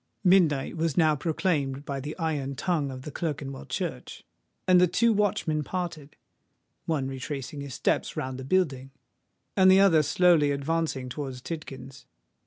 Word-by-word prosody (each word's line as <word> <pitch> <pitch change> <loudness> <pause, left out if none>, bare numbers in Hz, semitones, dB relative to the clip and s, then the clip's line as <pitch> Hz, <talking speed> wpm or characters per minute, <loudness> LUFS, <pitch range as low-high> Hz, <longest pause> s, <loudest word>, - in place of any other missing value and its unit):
Midnight 170 -6 +3
was 160 -2 -1
now 155 -3 +4
proclaimed 150 -3 -1
by 140 -2 -3
the 145 +3 -6
iron 150 -5 -2
tongue 155 -1 -1
of 130 -1 -8
Clerkenwell 140 - -4
Church; - - -5 0.4
and 180 -1 +6
the 180 - +6
two 230 +6 +3
watchmen 185 -7 0
parted—one 155 -3 -6
retracing 135 +1 -5
his 140 -3 -7
steps - - -1
round 130 -3 -3
the - - -6
building; 135 -4 0 0.7
and 190 -1 +6
the 190 +1 +7
other 185 -6 +6
slowly 165 -1 +4
advancing 140 -1 -1
towards 130 -1 -5
Tidkins. 135 -3 -8
150 Hz, 140 wpm, -27 LUFS, 135-175 Hz, 0.7 s, the